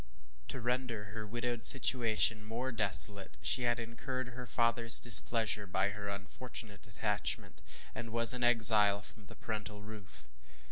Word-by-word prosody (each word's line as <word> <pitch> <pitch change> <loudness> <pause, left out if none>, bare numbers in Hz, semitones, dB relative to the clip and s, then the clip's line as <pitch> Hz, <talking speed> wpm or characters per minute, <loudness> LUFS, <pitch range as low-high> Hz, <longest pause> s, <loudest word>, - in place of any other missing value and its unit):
To 130 - -8
render 120 -3 -6
her 110 -1 -9
widowed 120 +1 -6
situation 115 -4 +3
more 120 +4 -7
desolate, 100 -3 +1
she 125 - -1
had 120 0 -3
incurred 125 +2 -8
her 125 0 -12
fatherŌĆÖs 115 -1 0
displeasure 110 -3 +3
by 95 +2 -3
her 100 0 -9
unfortunate 100 +1 -10
attachment, 105 0 -5 0.3
and 115 - -10
was 115 +1 +8
an 125 -1 -6
exile 110 -4 +4
from 105 0 -13
the - - -15
parental 105 -1 -9
roof. 105 - -13
115 Hz, 140 wpm, -30 LUFS, 105-120 Hz, 0.3 s, was